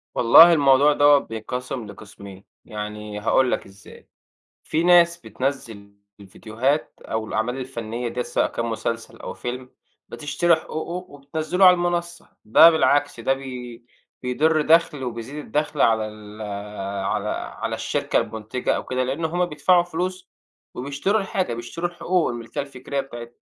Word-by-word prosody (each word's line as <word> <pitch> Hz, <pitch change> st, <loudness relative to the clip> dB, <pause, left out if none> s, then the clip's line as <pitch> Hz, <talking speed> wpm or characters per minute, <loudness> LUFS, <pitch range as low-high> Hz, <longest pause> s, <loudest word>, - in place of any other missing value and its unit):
والله 160 Hz, +9 st, +8 dB
الموضوع 145 Hz, -1 st, +5 dB
دوّة 145 Hz, 0 st, +6 dB
بيتقسم 125 Hz, +1 st, -5 dB
لقسمين، 100 Hz, -1 st, -12 dB, 0.2 s
يعني 105 Hz, 0 st, -6 dB
هاقول 125 Hz, +4 st, +2 dB
لك -, -, -2 dB
إزاي؛ 100 Hz, +1 st, -16 dB, 0.6 s
في 160 Hz, +2 st, -1 dB
ناس 170 Hz, -1 st, +5 dB
بتنزّل 120 Hz, -10 st, -5 dB, 0.3 s
الفيديوهات 115 Hz, +8 st, -2 dB
أو 110 Hz, 0 st, -4 dB
الأعمال 120 Hz, +5 st, -2 dB
الفنية 120 Hz, -2 st, -5 dB
ديّة 125 Hz, +1 st, -3 dB
سواء 120 Hz, -, 0 dB
كان 115 Hz, -, -4 dB
مسلسل 115 Hz, 0 st, -4 dB
أو -, -, -7 dB
فيلم 125 Hz, +1 st, -6 dB, 0.4 s
بتشتري 165 Hz, +3 st, +1 dB
حقوقه 170 Hz, +3 st, -6 dB
وبتنزِّله 155 Hz, +6 st, 0 dB
على 180 Hz, -, +9 dB
المنصة، 175 Hz, -1 st, -2 dB, 0.2 s
ده 160 Hz, +10 st, +8 dB
بالعكس 145 Hz, -3 st, +2 dB
ده 135 Hz, -, +1 dB
بي 125 Hz, -3 st, -8 dB, 0.4 s
بيدر 155 Hz, +5 st, +2 dB
دَخْل 155 Hz, -3 st, +3 dB
وبيزيد 120 Hz, +3 st, -6 dB
الدخل 150 Hz, -1 st, -1 dB
على 110 Hz, -1 st, +3 dB
ال 105 Hz, 0 st, -11 dB, 0.6 s
على -, -, -1 dB
على -, -, -4 dB
الشركة -, -, 0 dB
المنتجة 110 Hz, +3 st, -3 dB
أو -, -, -4 dB
كده 130 Hz, 0 st, -1 dB
لأن 135 Hz, +6 st, -2 dB
هُم 175 Hz, +2 st, 0 dB
بيدفعوا 175 Hz, +3 st, +3 dB
فلوس 180 Hz, +2 st, -4 dB, 0.4 s
وبيشتروا 140 Hz, +11 st, -1 dB
الحاجة، 190 Hz, -8 st, -2 dB
بيشتروا 120 Hz, +9 st, -4 dB
الحقوق 175 Hz, 0 st, 0 dB
الملكية 120 Hz, +4 st, -5 dB
الفكرية 140 Hz, 0 st, -5 dB
بتاعتها. 120 Hz, -3 st, -10 dB
135 Hz, 140 wpm, -23 LUFS, 115-160 Hz, 0.6 s, على